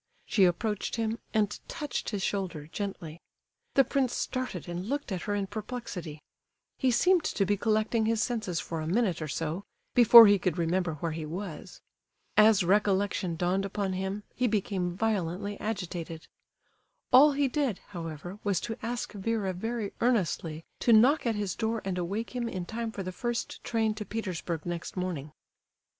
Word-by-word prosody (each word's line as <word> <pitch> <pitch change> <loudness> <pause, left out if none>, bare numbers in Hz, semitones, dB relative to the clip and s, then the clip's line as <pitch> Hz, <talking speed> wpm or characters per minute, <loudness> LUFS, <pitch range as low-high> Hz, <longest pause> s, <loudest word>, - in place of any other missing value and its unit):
She 195 - +4
approached 205 +4 0
him, 225 0 -1
and 210 -2 0
touched 295 -1 -3
his 200 -3 -3
shoulder 185 -7 -2
gently. 170 -2 -6 0.5
The 270 - +7
prince 265 -1 0
started 255 -10 -3
and 175 +4 -4
looked 285 -4 -2
at 185 -2 -2
her 205 - +1
in 200 -1 0
perplexity; 195 -7 -6 0.6
he 260 - +3
seemed 345 +8 +4
to 195 - +1
be 205 +2 +2
collecting 215 +1 +1
his 225 -1 +1
senses 215 -7 -1
for 165 -1 -4
a 155 - -4
minute 190 -2 +1
or 155 - -3
so, 165 +5 -3 0.3
before 235 -1 +10
he 205 -1 +5
could 180 -3 -1
remember 170 0 0
where 165 +2 -3
he 155 -1 -5
was. 175 +1 -7 0.5
As 215 -2 +6
recollection 195 -1 +2
dawned 180 +3 0
upon 195 -1 -2
him, 190 +2 -3
he 250 - +1
became 190 -5 -1
violently 200 -2 -1
agitated. 175 -6 -4 0.9
All 285 +3 +8
he 280 0 +2
did, 265 -6 -1
however, 175 +1 -7
was 200 -4 +1
to 225 -1 -5
ask 240 +1 -3
Vera 205 -1 -1
very 225 +2 -3
earnestly 170 -9 0
to 235 - +4
knock 250 +6 +5
at 225 - +1
his 205 -3 -2
door 225 0 -1
and 185 -2 -2
awake 205 +8 -3
him 240 -2 -1
in 185 -5 -4
time 230 +3 -4
for 200 - -5
the 185 - -4
first 235 +4 -3
train 225 -2 +1
to 215 0 -5
Petersburg 180 -6 -4
next 175 +1 -5
morning. 170 -6 -3
200 Hz, 170 wpm, -29 LUFS, 175-225 Hz, 0.9 s, before